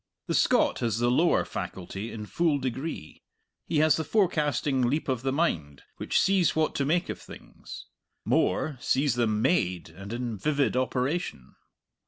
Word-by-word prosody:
The - - -2
Scot - - +3
has 115 -3 0
the 120 +1 +2
lower 165 +7 +3
faculty 95 +4 -6
in 105 -2 -6
full 160 +5 +1
degree; 130 - -5 0.5
he 160 - 0
has 155 -2 +4
the 160 - -1
forecasting 150 - +1
leap 130 +6 0
of 130 -4 -1
the 135 +1 -1
mind 80 - -1
which - - 0
sees 190 -3 +3
what 155 0 +1
to 140 - -1
make 175 +5 +1
of - - -4
things - - -11 0.4
more, 145 -5 +1
sees 140 -1 +2
them 110 -3 0
made 90 - +1
and 95 +2 -10
in 120 -2 -3
vivid 145 +3 +1
operation. 130 - -2
130 Hz, 160 wpm, -27 LUFS, 115-155 Hz, 0.5 s, has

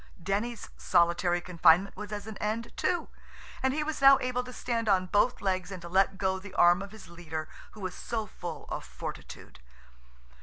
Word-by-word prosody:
Denny's 205 +6 -2
solitary 175 0 +2
confinement 175 +2 +4
was 210 +1 -7
at 205 -1 -5
an 220 -1 -7
end, 220 +2 -3
too–and 325 -5 -3
he 300 +3 -1
was 305 -1 -4
now 275 0 +9
able 250 0 -1
to 250 - -9
stand 230 -2 -2
on 185 -2 +3
both 205 +6 +2
legs 185 -2 -1
and 190 - -6
to - - -7
let 195 +1 +2
go 190 -1 0
the 190 0 -11
arm 175 +2 +5
of 200 - -6
his 220 -2 -12
leader 160 -2 -6 0.3
who 215 - -12
was 185 -1 -4
so 225 -2 -3
full 175 -5 -7
of - - -4
fortitude. - - -9
195 Hz, 185 wpm, -29 LUFS, 175-230 Hz, 0.3 s, now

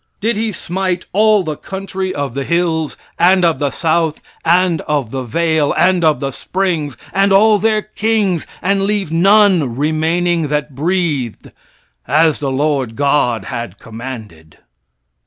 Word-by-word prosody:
Did 225 +2 0
he 220 +1 -1
smite 185 0 -3
"all 210 0 +4
the 155 -3 -3
country 190 +2 -5
of 145 -7 -3
the 140 +1 -3
hills, 165 -1 -1 0.2
and 180 +1 +4
of 165 -5 +1
the 145 -1 0
south, 160 +1 0 0.2
and 175 -1 +2
of 145 -7 -1
the 135 - -3
vale, 160 +4 0
and 180 +1 +3
of 155 -2 +3
the 135 -1 -3
springs, 165 - -2 0.2
and 195 +1 +2
all 210 +2 +5
their 215 +1 +1
kings, 215 -5 -1 0.2
and 195 +1 +1
leave 200 -5 -1
none 180 - +4
remaining 160 +3 0
that 150 0 -2
breathed, 150 - -2 0.6
as 155 0 +3
the 140 -2 -2
Lord 135 -4 -1
God 140 -4 +1
had 115 -5 -6
commanded?" 110 -9 -9
165 Hz, 145 wpm, -16 LUFS, 140-190 Hz, 0.6 s, all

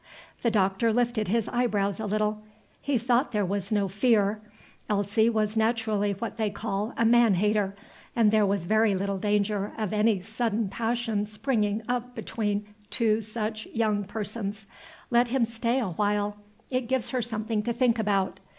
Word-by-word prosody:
The 235 - +2
Doctor 205 +1 +2
lifted 235 -1 +1
his 225 +3 +1
eyebrows 210 -5 0
a 220 - -3
little. 215 +1 0 0.4
He 285 -3 +1
thought 245 +3 +1
there 210 -2 +1
was 195 +1 -3
no 205 -2 +2
fear. 210 0 +2 0.5
Elsie 210 +2 +2
was 215 -1 0
naturally 220 -2 +1
what 220 +3 -5
they 220 -2 +1
call 205 +1 -3
a 230 - +2
man 230 -3 +5
hater, 205 +1 +1 0.4
and 225 -3 +4
there 215 -2 +4
was 195 -3 0
very 215 +1 +3
little 195 0 -2
danger 205 0 0
of 215 -2 -2
any 210 -1 +3
sudden 225 -1 -1
passion 225 -1 -1
springing 215 -1 -1
up 245 0 -2
between 210 -2 -2 0.2
two 225 -3 +2
such 215 0 -4
young 215 -3 0
persons. 210 0 -4 0.5
Let 240 0 +4
him 250 -1 +2
stay 230 +2 -1
awhile; 205 0 0 0.4
it 255 -2 -1
gives 260 -1 0
her 255 -2 0
something 220 -1 -2
to 235 - -2
think 235 -1 +2
about. 200 -3 0
215 Hz, 160 wpm, -27 LUFS, 205-230 Hz, 0.5 s, man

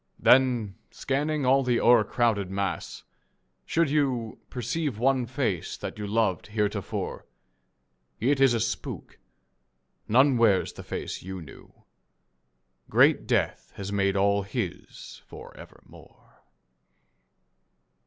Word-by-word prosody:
Then, 125 -6 +3
scanning 145 +1 -2
all 135 +2 +4
the 125 -2 +1
o'ercrowded 115 -3 +3
mass, 95 0 -4 0.6
should 165 -1 +2
you 130 -7 -1
Perceive 125 +1 -3
one 130 +1 +1
face 115 - -2
that - - -7
you 105 - -4
loved 105 -5 0
heretofore, 105 -1 -3 0.9
It 135 +4 +1
is 135 -3 +5
a - - 0
spook. 115 +1 -5 0.9
None 130 +3 +4
wears 105 -5 +3
the - - -10
face - - -5
you 95 +1 -7
knew. 75 -5 -15 1.1
Great - - +4
death - - -1
has 100 0 -6
made 100 -1 +1
all 100 +1 +2
his 100 -2 -6
for - - -12
evermore. - - -17
115 Hz, 110 wpm, -26 LUFS, 100-130 Hz, 1.1 s, is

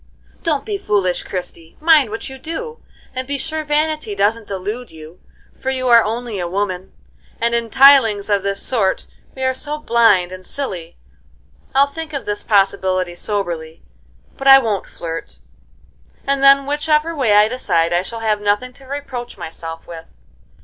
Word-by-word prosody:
"Don't 305 -4 0
be 415 -2 -3
foolish, 200 - 0
Christie! 170 -3 -7
Mind 310 -6 +5
what 225 +2 -5
you 265 0 -9
do, 460 - -6 0.3
and 255 0 -4
be 285 0 -2
sure 315 +2 -3
vanity 300 -6 -1
doesn't 210 +3 +1
delude 205 +6 -5
you, 160 +2 -13 0.4
for 265 - -2
you 255 -1 -1
are 235 -1 +7
only 225 -1 -3
a 175 - -2
woman, 190 0 -3 0.5
and 235 +1 +1
in 235 -1 0
things 240 -7 +6
of 205 -2 +2
this 195 0 -3
sort 215 -7 0 0.3
we 265 - -5
are 260 0 +2
so 295 +3 -5
blind 225 -10 +3
and 185 0 -9
silly. 185 -10 -6 0.8
I'll 275 +1 +6
think 315 +2 -8
of 280 - -4
this 205 0 -3
possibility 190 -3 +1
soberly, 175 -5 -4 0.5
but 270 - -3
I 270 0 +11
won't 220 -7 -1
flirt, 165 -1 -7 0.8
and 275 0 0
then 275 0 +6
which 295 +2 -3
ever 310 +2 +2
way 250 -8 +2
I 210 +1 +6
decide 175 -9 0
I 175 - +3
shall 225 +4 -7
have 215 -2 0
nothing 210 +5 0
to 270 - -15
reproach 260 -3 -6
myself 165 0 -8
with." 165 -1 -9
230 Hz, 170 wpm, -19 LUFS, 195-275 Hz, 0.8 s, I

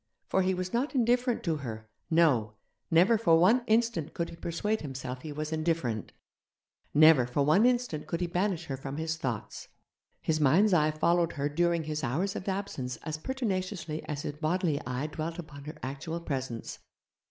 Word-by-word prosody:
For 190 - +3
he 185 0 +1
was 185 0 -4
not 265 +5 0
indifferent 245 0 +2
to 165 -4 0
her 110 -6 -7 0.2
no, 140 -11 +3 0.3
never 185 +7 +5
for 170 -7 +5
one 215 +9 +5
instant 220 -8 +1
could 170 - -2
he - - -9
persuade 205 +7 -2
himself 130 -3 -6
he 155 - -6
was 155 +2 -4
indifferent, 155 -9 -1 0.8
never 150 -4 +6
for 140 +3 +1
one 190 +11 +5
instant 245 -12 0
could 165 +1 -2
he 180 - 0
banish 175 0 -1
her 135 -4 -4
from 135 +1 -6
his 160 0 -1
thoughts. 125 -9 -4 0.5
His 155 -1 0
mind's 180 +9 +5
eye 155 -3 +4
followed 170 +2 +2
her 140 0 -1
during 170 +2 +1
his 155 0 -3
hours 175 +11 -1
of 190 - -4
absence 190 -10 -3
as 155 -1 -4
pertinaciously 185 - -3
as 145 -1 -4
his 145 - -3
bodily 155 -1 0
eye 125 +3 -2
dwelt 155 +2 -4
upon 145 -5 -9
her 155 +1 -7
actual 140 +6 -4
presence. 130 -7 -4
160 Hz, 175 wpm, -29 LUFS, 145-185 Hz, 0.8 s, never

